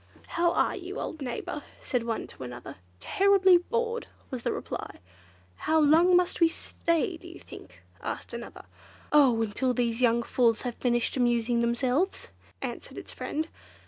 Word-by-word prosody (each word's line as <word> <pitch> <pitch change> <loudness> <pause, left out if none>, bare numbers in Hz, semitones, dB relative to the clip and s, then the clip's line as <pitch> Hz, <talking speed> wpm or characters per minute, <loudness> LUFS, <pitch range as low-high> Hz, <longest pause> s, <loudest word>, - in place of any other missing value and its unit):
"How 345 0 +2
are - - +2
you, 380 +3 -6
old 315 - -5
neighbour?" 260 +3 -4 0.2
said 250 -3 -1
one 230 -1 -3
to - - -15
another. 125 -1 -8 0.2
"Terribly 385 - +5
bored!" 465 +5 -2 0.2
was 255 -2 -4
the - - -1
reply. - - -5 0.6
"How 315 0 +2
long 325 +4 +5
must 360 0 0
we 335 - +8
stay, 335 +1 -1
do 350 - -13
you 345 - -11
think?" - - -13 0.2
asked - - -5
another. - - -8 0.5
"Oh! 270 -6 +6
until 245 +4 -1
these 235 -1 0
young 235 -1 +3
fools 230 -2 +2
have 245 -2 -2
finished 240 +1 0
amusing 240 -1 +2
themselves," 250 +9 0 0.3
answered - - -6
its - - -8
friend. 315 +2 -3
270 Hz, 155 wpm, -28 LUFS, 235-345 Hz, 0.6 s, we